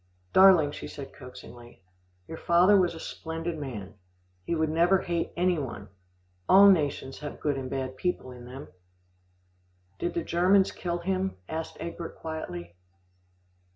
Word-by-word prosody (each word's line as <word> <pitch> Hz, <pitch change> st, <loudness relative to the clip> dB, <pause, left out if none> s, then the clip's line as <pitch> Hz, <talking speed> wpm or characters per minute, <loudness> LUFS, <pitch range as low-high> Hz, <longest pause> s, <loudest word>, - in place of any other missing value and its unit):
"Darling," 185 Hz, -6 st, +7 dB
she -, -, -7 dB
said 140 Hz, -2 st, -9 dB
coaxingly, 120 Hz, -4 st, -13 dB, 0.4 s
"your 160 Hz, -, -7 dB
father 180 Hz, +4 st, +5 dB
was 180 Hz, -3 st, +3 dB
a -, -, -8 dB
splendid 165 Hz, +1 st, -5 dB
man. 110 Hz, -9 st, -6 dB, 0.5 s
He 170 Hz, -, -2 dB
would 160 Hz, -1 st, 0 dB
never 170 Hz, +4 st, +4 dB
hate 170 Hz, -2 st, -2 dB
any 180 Hz, -1 st, +2 dB
one. 115 Hz, -7 st, -6 dB, 0.6 s
All 200 Hz, +1 st, +9 dB
nations 145 Hz, -6 st, -1 dB
have 150 Hz, -1 st, -7 dB
good 145 Hz, -2 st, 0 dB
and 130 Hz, -1 st, -5 dB
bad 130 Hz, -1 st, -4 dB
people 180 Hz, -7 st, -2 dB
in 125 Hz, -1 st, -11 dB
them." 130 Hz, +3 st, -9 dB, 1.3 s
"Did 175 Hz, -, -2 dB
the 170 Hz, -, -1 dB
Germans 185 Hz, +3 st, +3 dB
kill 175 Hz, -1 st, -3 dB
him?" 190 Hz, +2 st, -2 dB
asked 160 Hz, 0 st, -5 dB
Egbert 170 Hz, 0 st, -6 dB
quietly. 90 Hz, -, -6 dB
160 Hz, 145 wpm, -28 LUFS, 135-175 Hz, 1.3 s, All